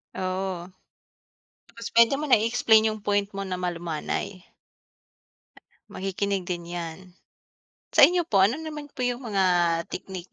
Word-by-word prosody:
Oo. 185 -1 -3 0.9
Tapos 230 0 -9
puwede 235 +2 +6
mo 305 - -2
na 255 - +7
i-explain 220 0 +3
'yong 215 - -10
point 205 0 0
mo 195 - -4
na 190 -2 -4
malumanay. 175 +1 -4 1.5
Makikinig 195 0 -2
din 175 -1 -5
'yan. 175 +1 -7 0.8
Sa - - +4
inyo 355 0 +6
po, 200 -11 +2
ano 205 +7 +4
naman 305 -2 -7
po 255 -3 -4
'yong 245 0 -1
mga 195 -3 +1 0.5
technique 185 -1 -7
195 Hz, 135 wpm, -25 LUFS, 180-230 Hz, 1.5 s, na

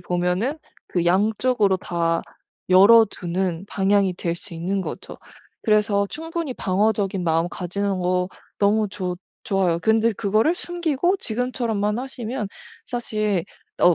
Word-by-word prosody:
보면은 180 - -1 0.3
그 175 -2 -1
양쪽으로 210 +3 +2
다 170 -2 -1 0.5
열어두는 190 -3 +4
방향이 195 -1 +2
될 170 -1 -2
수 170 - -9
있는 185 +4 -1
거죠. - - -7 0.4
그래서 210 -2 +2
충분히 325 -1 -4
방어적인 200 -1 0
마음 165 +1 +1
가지는 195 +2 -2
것 180 0 0 0.3
너무 210 +1 +3
좋 185 -3 -4 0.3
좋아요. 185 -4 +1
근데 220 +4 +3
그거를 215 - +2
숨기고 350 0 0
지금처럼만 225 - -1
하시면 250 -3 -4 0.4
사실 215 -6 -1 0.4
어 175 - +6
200 Hz, 270 characters per minute, -23 LUFS, 180-225 Hz, 0.5 s, 어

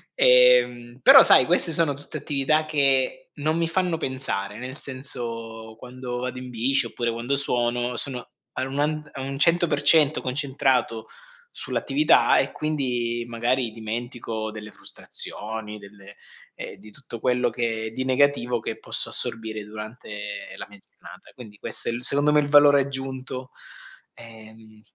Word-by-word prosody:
Ehm, - - +4
però - - +9
sai 130 - +6
queste 175 -1 +2
sono 155 -3 +6
tutte 145 +2 -9
attività 150 +2 0
che 135 -3 +2
non 155 +2 -1
mi 170 -1 0
fanno 175 -1 -1
pensare; 130 -8 -4
nel 130 +3 -8
senso 115 -4 -5
quando 125 0 -7
vado 125 0 -5
in 125 0 -8
bici 130 +4 +1
oppure 120 -1 -3
quando 120 +4 -2
suono 120 -2 -1
sono 130 -3 -1
a 120 - -13 0.3
anuand 150 +3 -2
a 135 - -7
un 135 +1 -5
100% 155 -2 +3
concentrato 130 -4 -1 0.5
sull'attività 300 +3 +2
e - - 0
quindi 125 -6 -2
magari 120 +1 -1
dimentico 115 0 -5
delle 105 0 -10
frustrazioni, 105 0 -4
delle 100 0 -15 0.4
ehm, - - -9
di 105 +2 -15
tutto 120 0 -10
quello 125 0 +1
che 115 -2 -3
di 130 +2 -4
negativo 130 -2 +1
che 110 0 -6
posso - - 0
assorbire 110 -2 0
durante 105 -1 -8
la - - -8
mia 100 - -15
giornata. - - -16
Quindi 110 -5 -13
questo - - -3
è - - 0
il 120 +1 -6
secondo 145 +3 +3
me 150 - +4
il 145 - -1
valore 145 -1 +6
aggiunto. 130 -1 -6 0.6
Ehm, 110 -1 -15
125 Hz, 145 wpm, -23 LUFS, 115-140 Hz, 0.6 s, però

